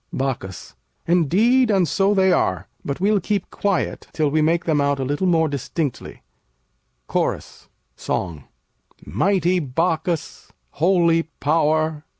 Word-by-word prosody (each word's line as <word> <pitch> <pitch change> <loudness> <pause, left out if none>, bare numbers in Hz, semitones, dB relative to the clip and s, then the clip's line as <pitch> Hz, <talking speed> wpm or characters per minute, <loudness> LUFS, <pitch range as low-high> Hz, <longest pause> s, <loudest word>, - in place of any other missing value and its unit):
Bacchus 130 -9 -4 0.3
Indeed, 205 - +3
and 190 -5 +3
so 195 +7 +2
they 190 -1 +4
are; 95 0 0 0.2
but 140 - -4
we'll 205 +2 +2
keep 200 +1 -2
quiet 200 -3 -2
Till 150 -3 0
we 155 +1 +2
make 165 +2 +1
them 155 -3 +2
out 140 0 +1
a - - -1
little 145 +8 -1
more 165 -2 +3
distinctly. 145 0 -4 0.8
CHORUS - - -3 0.3
[song] 80 -6 -4 0.6
Mighty 185 -2 +1
Bacchus! 165 +3 -2 0.2
Holy 170 0 +3 0.2
Power! 155 0 +1
165 Hz, 125 wpm, -21 LUFS, 145-185 Hz, 0.8 s, they